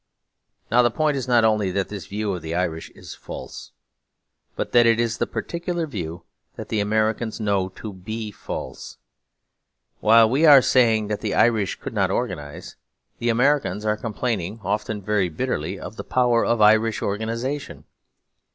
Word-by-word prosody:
Now 120 +2 +6
the 120 - +3
point 150 +4 0
is 130 -2 -3
not 120 -2 +4
only 105 -3 +2
that 95 +1 -2
this 100 -3 -7
view 105 0 -2
of 90 - -5
the 80 +1 -4
Irish 85 -3 -2
is - - -10
false, - - -9 0.8
but - - -3
that 120 -1 +5
it 115 0 +3
is 115 -1 -1
the - - 0
particular 170 0 -3
view 90 - -6 0.3
that - - -8
the 110 - 0
Americans 110 +2 0
know 100 -3 0
to 105 -2 -7
be 110 +4 -6
false. - - -7 1.0
While 115 +1 +6
we 135 +7 +1
are 145 -2 +10
saying 115 -4 +3
that 105 - -2
the - - -2
Irish 110 -4 +2
could - - -7
not 100 -3 +1
organise, 90 -10 -4 0.4
the 120 - 0
Americans 120 -4 +1
are 105 0 +2
complaining, 110 -2 -3
often 105 +1 -2
very 100 -2 +1
bitterly, 90 -3 -3
of 110 - -9
the - - -5
power 120 -2 +2
of 115 -2 +1
Irish 110 +1 +4
organisation. 115 +7 -3
110 Hz, 165 wpm, -23 LUFS, 100-120 Hz, 1.0 s, are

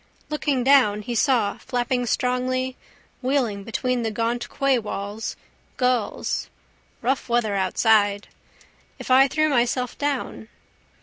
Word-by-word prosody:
Looking 290 -4 0
down 250 -6 +4
he 240 - -4
saw 230 -4 +1
flapping 245 -1 -1
strongly, 255 +2 0 0.5
wheeling 250 -7 0
between 250 +3 -1
the 225 - -1
gaunt 230 +2 -2
quaywalls, 220 -5 -2 0.4
gulls. 250 -4 -1 0.5
Rough 255 +1 -1
weather 235 -3 +1
outside. 205 +1 +2 0.7
If - - -6
I 265 +1 +7
threw 310 +3 +1
myself 250 -2 0
down? 285 -6 -3
245 Hz, 110 wpm, -23 LUFS, 220-260 Hz, 0.7 s, I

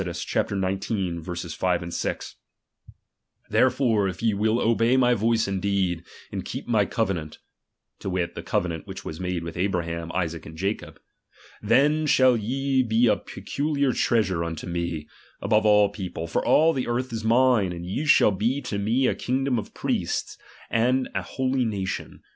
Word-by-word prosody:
xis. 90 -1 -2
5, 85 -2 -1
6): - - -3 1.2
Therefore 125 -6 +3
if 90 +4 -7
ye 115 -2 +3
will 110 +3 +1
obey 115 +2 +3
my 125 -1 +4
voice 115 0 +1
indeed, 95 -3 0 0.3
and - - -4
keep - - -6
my 110 -4 +3
covenant, 95 -9 -2 0.6
(to - - -4
wit, 90 -2 -1
that - - -8
covenant 85 -3 -1
which - - -8
was 80 - -6
made 90 -2 -2
with 85 -1 -6
Abraham, 85 -3 -2
Isaac 85 -3 -2
and 80 0 -10
Jacob); 100 +5 -3 0.6
then 145 +8 +3
shall 130 -3 +5
ye 130 +4 0
he 115 +2 +4
a 115 - +4
peculiar 140 -2 -2
treasure 105 -6 +1
nnto 85 0 -4
me, 85 -3 -3 0.3
above 110 +1 +2
all 105 -1 +5
people; 90 -5 -5
for 80 - -1
all 160 +2 +4
the 130 -3 -2
earth 120 +1 -2
is 110 -1 -3
mine, 115 -4 +3
and 85 0 -6
ye 100 +12 -3
shall 145 -7 +6
be 115 +8 0
to 115 -7 -4
me 115 +6 +1
a - - +3
kingdom 130 -1 0
of 105 - -9
priests, - - -2 0.4
and 125 +3 +2
an - - -1
holy 130 -1 -1
nation. 100 -5 -4
105 Hz, 160 wpm, -25 LUFS, 90-125 Hz, 1.2 s, shall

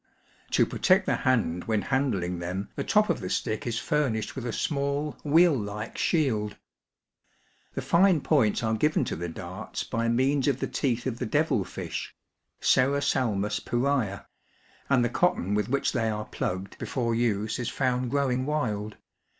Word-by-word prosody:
To - - +5
protect - - +3
the - - +1
hand 105 -10 +1
when 110 -2 0
handling 100 -11 0
them 90 +3 -4
the - - -2
top 210 0 +3
of - - -2
the 90 -3 -5
stick 110 +3 -2
is 115 -1 -1
famished 120 -9 -1
with 125 -3 -4
a - - -1
small 140 +2 -1
wheel 165 +3 +5
like 105 -1 -5
shield. 115 - 0 1.2
The - - -3
fine 175 -2 +4
points 130 -8 +2
are 110 0 +1
given 150 +8 +2
to - - -3
the 85 +1 -4
darts 95 +5 -6
by 115 0 -1
means 135 +4 +2
of 135 -2 +1
the - - -1
teeth 125 -4 -1
of 125 -2 -3
the - - -2
devil 145 -5 +2
fish - - -6 0.5
(Serrasalmue 125 -6 +2
pi/ray 130 0 +1
a); 100 0 -9 0.6
and 130 -3 +4
the - - +1
cotton 115 - +1
with 105 +1 0
which 140 +2 +1
they 115 -1 0
are 105 0 -3
plugged 95 +2 -4
before 120 -3 -1
use 110 -2 0
is 120 - -2
found 125 -2 0
grow 140 0 +1
ing 130 +2 -1
wild. 110 -9 -2
120 Hz, 170 wpm, -27 LUFS, 105-140 Hz, 1.2 s, To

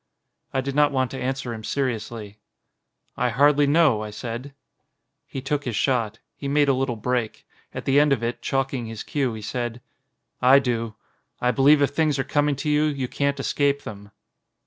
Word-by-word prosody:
I 135 - 0
did 135 +1 -4
not 145 +1 +4
want 130 -2 0
to 135 - -5
answer 130 -1 -2
him 110 -1 -8
seriously, 110 -5 -3 0.8
"I 125 - +1
hardly 145 +4 +4
know," 145 -7 +4
I 105 - -5
said. 120 +6 -6 0.7
He 135 - -6
took 145 +1 -1
his 120 -5 -3
shot. 115 -4 0 0.2
He 140 - -6
made 145 +1 +3
a 135 - +4
little 130 -2 -1
break. 120 0 -2 0.3
At - - -7
the 135 +1 +4
end 150 0 +4
of 125 -4 +1
it, 120 +1 -2
chalking 135 -3 -1
his 110 -1 -6
cue, 135 -5 -1
he 110 - -8
said: 120 +1 -3 0.6
"I 130 +2 +7
do. 115 -4 -1 0.4
I 125 - +2
believe 145 +3 +5
if 140 - +1
things 150 -1 +1
are 135 - 0
coming 145 +1 +1
to 140 +3 -5
you, 150 +1 +3
you 140 -4 -1
can't 140 +2 -1
escape 140 -1 +1
them." 100 -1 -9
135 Hz, 190 wpm, -24 LUFS, 115-140 Hz, 0.8 s, I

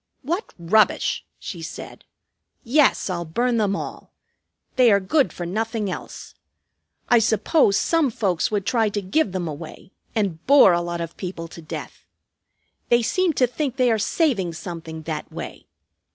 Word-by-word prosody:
"What 345 - -3
rubbish!" 195 +6 +2
she 175 -5 -7
said. 165 - -9 0.6
"Yes, 280 +3 +3
I'll 175 -3 -2
burn 235 +9 0
them 205 -3 +1
all. - - -7 0.6
They 250 -3 +6
are 200 - +5
good 260 +9 +2
for 175 - -6
nothing 215 +2 -2
else. - - -8 0.7
I 240 -2 +5
suppose 220 - +3
some 330 -4 +2
folks 195 -7 0
would 205 -3 -1
try 225 -2 +2
to 205 0 -2
give 195 +5 +1
them 180 -2 -3
away, 155 +4 -8 0.2
and 190 -7 -1
bore 270 -9 +7
a 175 - +1
lot 175 0 -4
of 165 -1 -6
people 175 -3 -5
to 170 - -11
death. 155 - -8 0.9
They 240 0 +4
seem 365 +7 +1
to 260 - +3
think 260 +1 -3
they 255 -2 +3
are 220 - +1
saving 215 - +1
something, 160 -1 -7
that 155 -1 -5
way. - - -8
205 Hz, 160 wpm, -23 LUFS, 175-245 Hz, 0.9 s, bore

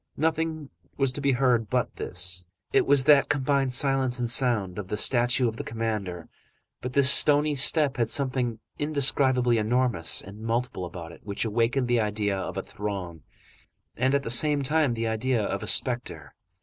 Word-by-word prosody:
Nothing 160 -1 -2 0.3
was 135 -2 +2
to 145 - -5
be 140 -1 +1
heard 120 -4 0
but - - -2
this. 90 0 -3 0.3
It - - +2
was 140 -1 +4
that 145 -1 +4
combined 140 -1 0
silence 135 -1 +2
and 120 -2 0
sound, 110 -7 +1
of 100 - -7
the 105 - -4
statue 120 +2 +2
of 110 0 -5
the - - -5
commander, 105 -7 -5 0.5
but 125 0 -6
this 140 -1 +4
stony 150 0 +4
step 145 0 +3
had 115 -2 -1
something 130 -5 0 0.2
indescribably 135 -5 +1
enormous 110 -7 0
and 100 +3 -12
multiple 115 -4 -3
about 85 -2 -9
it - - -16
which 100 +2 -4
awakened 120 +4 -1
the 120 -1 +1
idea 105 -1 -2
of 95 - -6
a - - -3
throng, 95 -6 -7 0.7
and, 130 +3 0
at 140 - -1
the 115 - -2
same 145 +3 +3
time, 150 -3 0
the 115 0 -3
idea 110 +1 -1
of - - -4
a - - -7
spectre. - - 0
125 Hz, 175 wpm, -25 LUFS, 105-135 Hz, 0.7 s, was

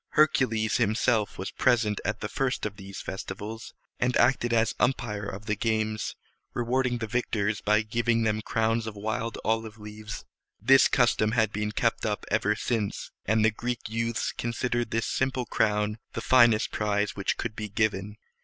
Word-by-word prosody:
Hercules 120 -8 +3
himself 110 -1 +1
was 95 - -4
present 115 -5 +2
at 105 - -2
the 110 - -2
first 130 +2 -1
of 105 -1 -4
these 100 -1 -8
festivals, 105 +4 -6 0.2
and 125 0 +2
acted 120 -1 +3
as 115 -1 +2
umpire 105 -5 0
of 100 +1 -7
the 105 -1 0
games, 110 0 -1 0.4
rewarding 125 +1 +1
the 115 - -3
victors 110 -2 -1
by 105 +1 +3
giving 115 +1 +1
them 110 -1 +1
crowns 115 +1 0
of 110 - -5
wild 110 +2 -3
olive 110 -1 -1
leaves. 105 0 -8 0.3
This 130 +5 +6
custom 115 -3 +2
had 110 -3 +2
been 105 +1 -1
kept 115 +2 0
up 105 -2 -2
ever 105 0 +2
since, 110 -3 -2 0.2
and 110 +1 +3
the 110 - +4
Greek 120 +3 -3
youths 115 0 -1
considered 120 0 -2
this 115 0 0
simple 130 -1 -1
crown 105 0 0
the 115 - -3
finest 120 -4 +5
prize 105 -1 0
which 100 - -1
could 110 -3 -4
be 105 -1 -5
given. 105 0 -1
110 Hz, 165 wpm, -27 LUFS, 105-120 Hz, 0.4 s, This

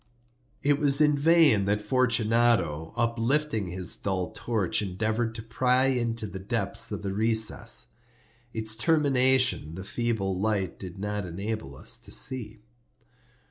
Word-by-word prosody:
It 145 0 +3
was 140 -1 +4
in 150 -1 +4
vain 145 - +4
that 100 +1 +1
Fortunato, 115 - +1
uplifting 115 0 0
his 90 0 -3
dull 95 -1 -3
torch, 110 -4 -1
endeavored 110 +4 -2
to 110 - -6
pry 125 +3 +2
into 115 -3 -1
the 95 -1 -7
depths 95 - -3
of - - -5
the 100 -1 -3
recess. 110 - 0 0.6
Its 110 -1 -1
termination 130 - +2
the 95 - -7
feeble 110 -3 -1
light 100 -3 -1
did 90 -2 -8
not 105 -1 -3
enable 100 -4 -5
us - - -3
to - - -12
see. 130 - -1
110 Hz, 135 wpm, -27 LUFS, 95-125 Hz, 0.6 s, was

